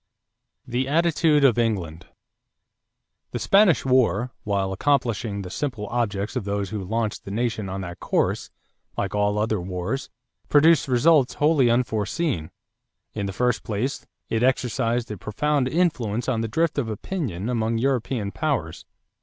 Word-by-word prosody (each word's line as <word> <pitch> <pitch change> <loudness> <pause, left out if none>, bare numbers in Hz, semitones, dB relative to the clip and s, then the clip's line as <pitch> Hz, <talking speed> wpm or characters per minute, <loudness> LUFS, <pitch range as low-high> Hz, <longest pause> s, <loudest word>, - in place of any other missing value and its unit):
=The 125 +2 -1
Attitude 160 -1 +3
of 120 -4 +5
England.= 90 -8 -2 1.3
The - - -1
Spanish 195 -7 +4
war, 125 -2 +2
while 100 -2 -1
accomplishing 115 -5 0
the 90 - -8
simple 125 -6 -3
objects 105 -3 -1
of 125 - -1
those 100 0 -2
who 105 -3 -3
launched 110 +2 -2
the - - -8
nation 110 -1 -2
on 95 +1 -4
that 90 -2 -7
course, - - 0 0.5
like 100 - -2
all 105 0 +1
other 110 -2 0
wars, 90 +9 -4 0.4
produced 155 0 +5
results 135 +2 +4
wholly 145 -4 +3
unforeseen. 115 - 0 0.6
In 100 -2 -3
the - - -3
first 125 +3 0
place, 115 +6 -3 0.2
it 115 - -1
exercised 120 -2 0
a 105 - -6
profound 140 - 0
influence 130 - 0
on 120 -4 0
the 115 - -1
drift 160 +4 0
of 120 -5 -2
opinion 110 - -4
among 115 -2 0
European 120 -4 -1
powers. 125 - -2
115 Hz, 145 wpm, -24 LUFS, 100-135 Hz, 1.3 s, of